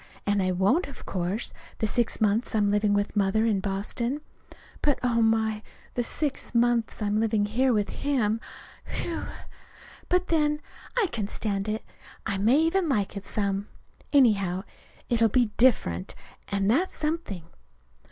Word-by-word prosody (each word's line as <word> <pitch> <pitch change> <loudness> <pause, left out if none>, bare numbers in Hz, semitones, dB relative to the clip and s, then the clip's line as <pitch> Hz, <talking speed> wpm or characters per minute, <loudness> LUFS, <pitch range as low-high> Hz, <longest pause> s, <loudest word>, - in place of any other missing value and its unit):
And 205 0 +2
I 185 0 +1
won't, 195 - +2
of 280 - -11
course, 185 +4 -2 0.2
the - - 0
six 235 +2 0
months 220 +2 +1
I'm 205 -2 +3
living 205 0 +2
with 205 +1 -1
Mother 205 +2 +2
in 215 -4 +2
Boston. 210 +8 -2 0.6
But, 290 -2 +2
oh, 235 -2 +2
my! 220 -1 +2 0.3
the 245 - 0
six 280 -1 -2
months 235 -2 +2
I'm 205 +1 +1
living 220 -2 +2
here 250 +5 +2
with 210 -3 +1
him 235 -6 0 0.5
whew! 335 - -3 0.8
But, 360 0 +2
then, 300 -2 +2 0.4
I 470 - +4
can 215 -4 -2
stand 200 -1 -2
it. 215 +1 -2 0.4
I 200 -3 -1
may 230 +7 +4
even 330 +1 +2
like 210 -6 0
it 200 - -5
some. 200 -1 -1 0.4
Anyhow, 200 -9 +3 0.4
it'll 230 -2 +3
be 235 0 +2
different. 95 - +2 0.3
And 200 -1 0
that's 310 - +2
something. 305 - -2
220 Hz, 150 wpm, -27 LUFS, 200-255 Hz, 0.8 s, I